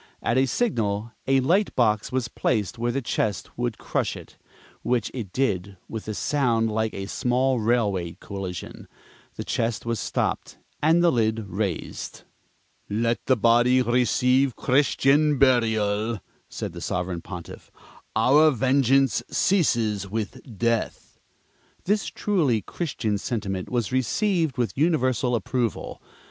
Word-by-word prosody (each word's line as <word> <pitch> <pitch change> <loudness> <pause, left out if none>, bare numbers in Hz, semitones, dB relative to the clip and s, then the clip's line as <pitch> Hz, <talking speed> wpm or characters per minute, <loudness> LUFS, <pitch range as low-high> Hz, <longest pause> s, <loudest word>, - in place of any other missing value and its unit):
At 115 - +1
a 130 +1 +3
signal, 115 - -1 0.2
a 135 0 +4
light 185 +10 +2
box 110 -1 +2
was 130 -2 -1
placed 110 -4 -1
where 120 +1 0
the 135 +2 -2
chest 105 -3 -2
would 120 -2 -2
crush - - -2
it - - -13 0.5
(which 120 -3 0
it 110 -8 -5
did 100 -7 -1
with 110 -1 -7
a 110 - -3
sound 115 -6 +1
like 110 0 0
a 95 - -4
small 125 +4 +1
railway 105 -7 0
collision); 95 -3 -7 0.5
the - - -5
chest 115 0 -2
was 115 -2 -1
stopped - - -2 0.2
and 165 +3 +4
the 170 - +5
lid 110 -2 0
raised. 95 -2 -4 0.7
"Let 115 +3 0
the 130 - +4
body 120 +3 +4
receive 125 +2 +2
Christian 145 +2 +3
burial," 110 -4 +2 0.3
said - - -5
the - - -8
Sovereign 90 -1 -2
Pontiff. 90 -2 -9 0.5
"Our 140 +8 +5
vengeance 135 0 +3
ceases 115 - +1
with 110 0 -4 0.2
death." 115 +2 -2 0.6
This 205 +2 0
truly 150 - 0
Christian 110 - -2
sentiment 100 -6 -3
was 120 -3 -1
received 160 - 0
with 115 -6 -1
universal 130 -6 +1
approval. 115 +1 -2
120 Hz, 130 wpm, -25 LUFS, 105-130 Hz, 0.7 s, the